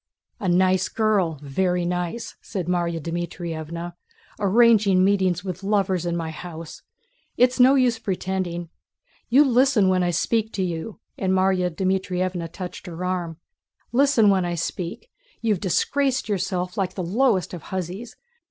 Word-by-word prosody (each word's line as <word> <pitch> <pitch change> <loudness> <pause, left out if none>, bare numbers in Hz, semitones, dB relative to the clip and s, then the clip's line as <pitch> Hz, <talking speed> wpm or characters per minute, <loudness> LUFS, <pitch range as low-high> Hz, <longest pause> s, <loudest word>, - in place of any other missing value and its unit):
"A 190 - -1
nice 185 +1 +3
girl! 200 -8 +1
Very 180 +5 0
nice!" 180 +6 -3
said 190 -5 -4
Márya 170 -1 -1
Dmítrievna. 170 0 -5 0.5
"Arranging 205 -2 +4
meetings 190 -3 +2
with 185 -1 -5
lovers 195 -3 0
in 170 0 -1
my 165 -1 -3
house! 165 0 -9 0.6
It's 250 +1 +3
no 260 +2 +7
use 245 -4 +2
pretending: 185 -4 -3 0.6
you 265 +5 +6
listen 250 -6 +3
when 185 -1 +2
I 175 - +1
speak 220 +6 0
to 190 - -1
you!" 175 +4 -4 0.2
And 190 -1 +1
Márya 185 -1 +2
Dmítrievna 185 -1 -1
touched 180 -1 -7
her 175 +1 -5
arm. 175 -3 -2 0.5
"Listen 245 -5 +4
when 190 -2 +2
I 175 0 -2
speak! 175 - -5 0.3
You've 215 -5 0
disgraced 260 - 0
yourself 185 -1 -2
like 185 -1 -1
the 185 - -3
lowest 205 +1 +1
of 175 - -6
hussies. 190 +5 -5
185 Hz, 145 wpm, -23 LUFS, 175-210 Hz, 0.6 s, no